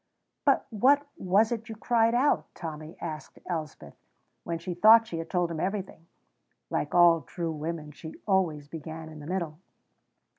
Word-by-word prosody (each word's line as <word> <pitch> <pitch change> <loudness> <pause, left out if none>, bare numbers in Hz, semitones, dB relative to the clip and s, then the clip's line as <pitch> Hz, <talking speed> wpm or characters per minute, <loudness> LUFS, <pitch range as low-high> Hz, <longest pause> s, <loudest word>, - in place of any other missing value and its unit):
"But - - +3
what 275 +7 +4
was 200 +5 +2
it 230 -1 -4
you 225 - -6
cried 230 +1 +2
out?" 275 +4 +2
Tommy 155 -1 -7
asked 155 -2 -7
Elspeth, 155 - -5 0.5
when 170 0 -3
she 175 +2 -5
thought 220 +6 +7
she 170 -6 -5
had 165 0 -6
told 175 -2 0
him 160 - -4
everything. 190 -2 -4 0.6
(Like 145 - -1
all 170 -2 +6
true 165 +5 -4
women, 155 0 -5
she 160 +2 -10
always 170 -7 +1
began 160 +1 -8
in 155 -1 -11
the 145 - -9
middle.) 170 -4 -3
170 Hz, 160 wpm, -28 LUFS, 155-205 Hz, 0.6 s, thought